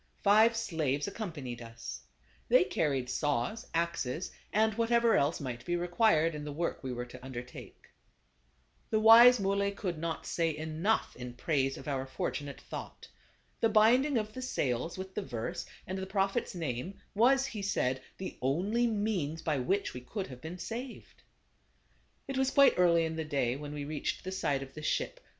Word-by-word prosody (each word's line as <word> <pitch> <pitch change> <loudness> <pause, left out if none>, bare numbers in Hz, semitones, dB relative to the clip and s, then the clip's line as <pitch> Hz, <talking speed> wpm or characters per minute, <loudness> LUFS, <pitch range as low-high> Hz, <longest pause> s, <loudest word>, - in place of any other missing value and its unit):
Five 220 +3 +5
slaves 155 -9 -1
accompanied 160 - -5
us. 115 0 -8 0.5
They - - +6
carried 140 - 0
saws, 145 - -1
axes 165 -2 -1 0.2
and 220 +1 +3
whatever 230 +1 +3
else 145 +4 +2
might 125 -5 -5
be 175 - -1
required 175 -2 +3
in 150 -1 -5
the 150 - -5
work 170 +1 -3
we 130 - -3
were 120 0 -4
to 125 +1 -12
undertake. 125 -1 -9 1.0
The 220 - +2
wise 235 +2 +9
Muley 200 0 +1
could 185 -5 -4
not 165 0 -3
say 165 -3 0
enough 160 +7 0
in 125 0 -7
praise 135 0 0
of - - -10
our 135 -2 -2
fortunate 140 +1 -4
thought. - - -8 0.5
The 225 - +3
binding 240 +6 +4
of 215 -1 -2
the 255 - -6
sails 140 - -1
with 190 0 -6
the 210 - -2
verse 120 - -4 0.2
and 185 +1 -4
the 190 - -4
Prophet's 195 -1 0
name 160 +3 -4
was, 260 +5 +4
he 225 -7 -5
said, 130 -9 0 0.2
the 190 - -7
only 195 - +1
means 205 -8 -1
by 150 -4 0
which 195 +11 0
we 125 - -7
could 190 - -4
have 125 -1 -10
been 160 +3 -6
saved. 235 +7 -7 1.1
It 275 -1 -2
was 265 0 +3
quite 275 0 +6
early 170 -2 +5
in 160 0 -4
the 160 - -1
day 135 -5 0
when 145 +1 -7
we 145 -1 -5
reached 150 0 -3
the 185 - -4
side 140 -8 0
of 135 - -12
the 155 - -8
ship. - - -1
170 Hz, 175 wpm, -31 LUFS, 140-215 Hz, 1.1 s, wise